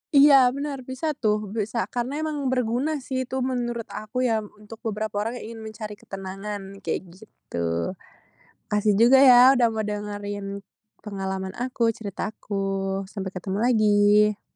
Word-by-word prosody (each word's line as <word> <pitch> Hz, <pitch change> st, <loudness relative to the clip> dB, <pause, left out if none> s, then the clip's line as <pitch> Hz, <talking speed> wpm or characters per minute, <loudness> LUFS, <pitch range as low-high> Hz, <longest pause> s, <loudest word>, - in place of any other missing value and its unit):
Iya, 280 Hz, 0 st, +8 dB, 0.2 s
benar, 285 Hz, -1 st, -3 dB
bisa 260 Hz, +5 st, -2 dB
tuh, 210 Hz, -7 st, -1 dB
bisa 220 Hz, +2 st, -1 dB
karena 260 Hz, +5 st, -2 dB
emang 305 Hz, -1 st, -2 dB
berguna 250 Hz, +4 st, 0 dB
sih, 260 Hz, -1 st, -3 dB
itu 260 Hz, -, -5 dB
menurut 240 Hz, -2 st, -2 dB
aku 235 Hz, +4 st, -3 dB
ya, 225 Hz, -3 st, +2 dB
untuk 210 Hz, +1 st, -12 dB
beberapa 210 Hz, -1 st, -2 dB
orang 225 Hz, +3 st, -2 dB
yang 245 Hz, -, -7 dB
ingin 225 Hz, -, -9 dB
mencari 215 Hz, -1 st, -7 dB
ketenangan, 195 Hz, +1 st, -7 dB
kayak -, -, -2 dB
gitu. 85 Hz, -, -4 dB, 0.8 s
Makasih 210 Hz, 0 st, +2 dB
juga 250 Hz, +3 st, +7 dB
ya, 255 Hz, +1 st, +8 dB
udah 240 Hz, -1 st, +4 dB
mau 220 Hz, -, -2 dB
dengerin 205 Hz, -1 st, -4 dB, 0.4 s
pengalaman 190 Hz, -2 st, -4 dB
aku, 245 Hz, -2 st, 0 dB
cerita 205 Hz, -1 st, -4 dB
aku, 215 Hz, -1 st, -12 dB, 0.6 s
sampai 190 Hz, -2 st, -5 dB
ketemu 190 Hz, +2 st, -4 dB
lagi. 210 Hz, -2 st, +4 dB
215 Hz, 145 wpm, -25 LUFS, 205-245 Hz, 0.8 s, Iya